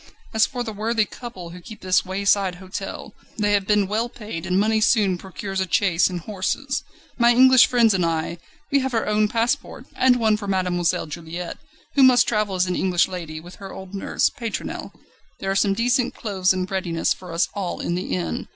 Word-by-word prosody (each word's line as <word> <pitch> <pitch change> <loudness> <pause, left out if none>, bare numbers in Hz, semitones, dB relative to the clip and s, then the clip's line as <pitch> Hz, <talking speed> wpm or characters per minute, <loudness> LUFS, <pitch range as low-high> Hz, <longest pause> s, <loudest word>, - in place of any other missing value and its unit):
As 220 0 +4
for 245 -2 -4
the 225 -2 -5
worthy 220 +1 0
couple 195 -8 -9
who 180 +1 -10
keep 220 +4 -11
this 185 0 +2
wayside 195 0 +1
hostel, 190 +3 -7 0.2
they 205 -1 +1
have 200 -1 +1
been 210 -1 +3
well 220 +4 -1
paid, 210 -8 -7
and 185 +1 +2
money 220 +1 +2
soon 210 -4 +3
procures 190 +2 -5
a 185 -3 -3
chaise 185 -3 +3
and 180 -2 -4
horses. 215 - -2 0.4
My 235 0 +6
English 260 0 +7
friends 235 -3 +4
and 185 -2 +1
I, 165 +1 -1 0.3
we 280 - +4
have 265 -2 -2
our 225 - +1
own 210 0 +2
passports, 235 +6 -2
and 255 -1 +4
one 220 -3 +2
for 205 -1 -7
Mademoiselle 180 -3 0
Juliette, 170 +2 -6 0.3
who 280 - +3
must 250 -2 +6
travel 210 -3 0
as 180 0 +2
an 180 -1 -1
English 180 -2 +2
lady, 165 -4 -6
with 175 +3 -13
her 195 -1 -9
old 190 0 -10
nurse, 195 - 0
Pétronelle. 235 -5 -5 0.5
There 195 - -2
are - - -1
some 195 0 +2
decent 245 +2 +1
clothes 190 -4 0
in 185 -1 0
readiness 185 -3 -1
for 180 -2 -11
us 165 +2 +1
all 195 -4 -3
in - - -2
the 175 - -2
inn. 85 -3 -3
195 Hz, 205 wpm, -23 LUFS, 180-225 Hz, 0.5 s, English